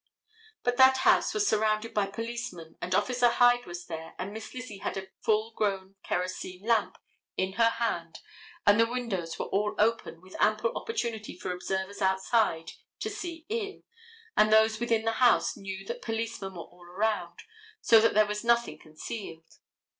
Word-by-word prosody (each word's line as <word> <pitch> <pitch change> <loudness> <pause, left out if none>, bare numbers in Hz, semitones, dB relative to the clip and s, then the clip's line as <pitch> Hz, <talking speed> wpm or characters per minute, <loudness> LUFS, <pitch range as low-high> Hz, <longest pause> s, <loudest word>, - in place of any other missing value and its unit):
But 245 0 0
that 260 0 +7
house - - +5
was 420 -1 +1
surrounded 215 +1 +1
by 205 -2 +1
policemen, 230 -6 -6
and 185 - -1
Officer 245 +4 +3
Hyde 245 0 +4
was 175 0 -7
there, 160 -1 -7
and 190 +3 -5
Miss 220 0 -8
Lizzie 250 -6 -8
had - - -3
a 190 0 -6
full 220 0 +1
grown 195 -3 -1
kerosene 185 +1 -4
lamp 225 -2 +1 0.4
in 190 0 -1
her 230 +2 +4
hand 175 -8 -2 0.5
and 205 +2 +6
the 230 - +5
windows 210 -9 -3
were - - -3
all 210 +2 -1
open 220 -6 +1
with 185 +2 -15
ample 215 +2 +2
opportunity 230 - -4
for 185 - -4
observers 190 +2 -3
outside 190 -3 +1 0.3
to 435 - -3
see 345 -5 -6
in 425 -2 -4 0.5
and 215 0 +4
those 220 0 +5
within 230 -2 +1
the 225 - +2
house 245 - +4
knew 195 0 -7
that - - -5
policemen 225 -4 -4
were 170 - -6
all 175 0 -20
around 180 -2 -2 0.4
so 225 - +6
that 230 - +3
there 215 0 +6
was 210 +1 -4
nothing 235 -10 +2
concealed. 165 +1 -9
215 Hz, 170 wpm, -29 LUFS, 190-235 Hz, 0.5 s, that